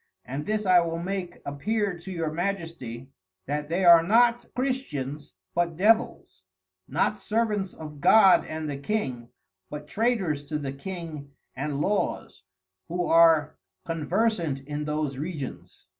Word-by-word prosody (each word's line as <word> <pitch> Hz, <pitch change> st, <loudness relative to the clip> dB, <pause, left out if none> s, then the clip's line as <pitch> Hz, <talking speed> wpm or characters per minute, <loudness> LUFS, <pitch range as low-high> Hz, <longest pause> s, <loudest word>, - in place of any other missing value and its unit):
And 140 Hz, +4 st, -5 dB
this 215 Hz, 0 st, -1 dB
I 185 Hz, -1 st, +6 dB
will 165 Hz, -1 st, -1 dB
make 180 Hz, 0 st, -5 dB
appear 200 Hz, +7 st, -1 dB
to 185 Hz, +3 st, -9 dB
your 165 Hz, -3 st, -2 dB
Majesty 165 Hz, -9 st, -4 dB, 0.3 s
that 145 Hz, +1 st, -3 dB
they 180 Hz, +3 st, 0 dB
are 170 Hz, -1 st, +9 dB
not 235 Hz, +6 st, +3 dB
Christians, 150 Hz, -, -3 dB, 0.2 s
but 170 Hz, -2 st, 0 dB
Devils; 220 Hz, -, +1 dB, 0.5 s
not 180 Hz, +8 st, 0 dB
Servants 210 Hz, -2 st, -1 dB
of 150 Hz, -2 st, -9 dB
God 195 Hz, 0 st, +7 dB
and 155 Hz, 0 st, -4 dB
the 145 Hz, -2 st, -3 dB
King, 135 Hz, -, -3 dB, 0.4 s
but 150 Hz, 0 st, -7 dB
Traitors 195 Hz, -11 st, 0 dB
to 150 Hz, +1 st, -3 dB
the 140 Hz, -2 st, -4 dB
King 155 Hz, -2 st, -7 dB, 0.3 s
and 140 Hz, +1 st, -3 dB
Laws, 205 Hz, +4 st, -1 dB, 0.5 s
who 175 Hz, +1 st, -1 dB
are 165 Hz, -3 st, +4 dB, 0.3 s
Conversant 165 Hz, -2 st, 0 dB
in 145 Hz, +2 st, -5 dB
those 150 Hz, -3 st, -2 dB
Regions. 150 Hz, -4 st, -7 dB
165 Hz, 135 wpm, -26 LUFS, 145-195 Hz, 0.5 s, are